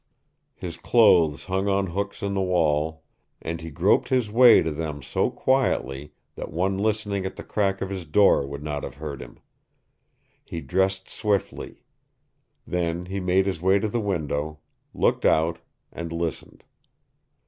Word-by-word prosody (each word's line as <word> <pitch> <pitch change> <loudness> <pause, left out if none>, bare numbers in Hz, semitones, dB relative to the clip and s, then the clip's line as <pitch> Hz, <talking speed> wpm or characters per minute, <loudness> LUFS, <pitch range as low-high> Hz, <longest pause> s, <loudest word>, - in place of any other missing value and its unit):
His 85 -3 -7
clothes 85 - +4
hung 95 +1 -1
on 100 0 +2
hooks 100 +3 -4
in 100 0 -1
the 95 - 0
wall, 80 -3 0 0.4
and 80 0 -5
he 80 - -7
groped 70 - +2
his 125 -5 +1
way 120 +1 +7
to 80 - -2
them 75 -2 -5
so - - 0
quietly 75 - 0 0.2
that - - -7
one 95 +4 0
listening 105 -2 -1
at 95 - -5
the - - -8
crack 100 -2 -1
of 95 - -5
his 95 -4 -5
door 75 -4 +4
would 70 +1 -7
not 75 -1 -3
have - - -6
heard 70 -2 -6
him. - - -11 1.1
He 85 - -6
dressed 95 +2 0
swiftly. 105 -3 -3 0.8
Then 85 0 -2
he 95 +2 -4
made 95 +1 +2
his 95 -4 -2
way 95 +2 +4
to 110 - -1
the 115 +2 -1
window, 80 -6 -2 0.3
looked - - +1
out, 80 +1 +2 0.3
and 85 -1 -6
listened. 85 -1 -5
90 Hz, 160 wpm, -25 LUFS, 80-100 Hz, 1.1 s, way